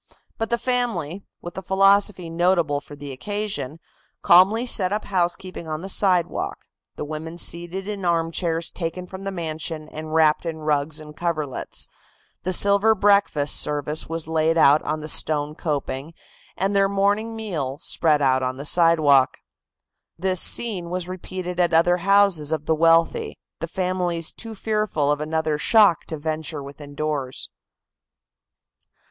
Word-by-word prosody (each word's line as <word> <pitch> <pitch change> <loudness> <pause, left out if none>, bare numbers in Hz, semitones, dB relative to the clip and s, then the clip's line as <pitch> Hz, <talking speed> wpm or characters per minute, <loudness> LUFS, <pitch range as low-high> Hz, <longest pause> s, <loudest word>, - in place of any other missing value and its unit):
But 225 - -2
the 235 - +1
family, 230 - -2 0.2
with 175 - -8
a - - -8
philosophy 195 0 +3
notable 165 -3 +1
for 145 +1 -12
the 145 -1 -8
occasion, 205 -2 -4 0.4
calmly 195 +7 +5
set 195 -6 +1
up 210 +1 -2
housekeeping 180 -2 -2
on 155 +1 -4
the 195 - -6
sidewalk, 185 -3 +1 0.3
the - - -5
women 160 +2 -6
seated 175 +3 -4
in 205 -2 -5
armchairs 165 -1 0
taken 180 +1 -5
from 190 +1 -9
the 195 - -2
mansion 160 -3 -5
and 155 0 -8
wrapped 155 -1 +3
in 165 -2 -4
rugs 150 0 -1
and 150 -1 -11
coverlets, 155 -6 -3 0.5
the 185 - -2
silver 200 +4 +4
breakfast 200 -8 +2
service 150 +1 -1
was 165 -1 -4
laid 160 0 +1
out 150 -1 +5
on 155 +1 -3
the 155 - -6
stone 150 -1 +2
coping 145 0 -4 0.4
and 195 +2 0
their 195 0 +3
morning 205 +3 0
meal 160 -12 -4
spread 150 -3 +2
out 130 -1 +3
on 130 0 -2
the 140 - -7
sidewalk. 155 -5 +4 0.8
This, 185 0 +1
scene 190 -8 +2
was 180 0 -4
repeated 185 -1 -6
at 175 -2 +2
other 175 +2 +4
houses 195 -5 +3
of 155 -2 -2
the 160 - +2
wealthy, 165 +1 +2 0.2
the 165 - -4
families 180 -2 -2
too 225 -1 -9
fearful 210 -9 0
of 150 0 -1
another 155 -1 -1
shock 205 -3 +4
to 160 - -5
venture 155 -1 -4
within 145 +1 -11
doors. 145 -4 -3
165 Hz, 150 wpm, -23 LUFS, 155-190 Hz, 0.8 s, calmly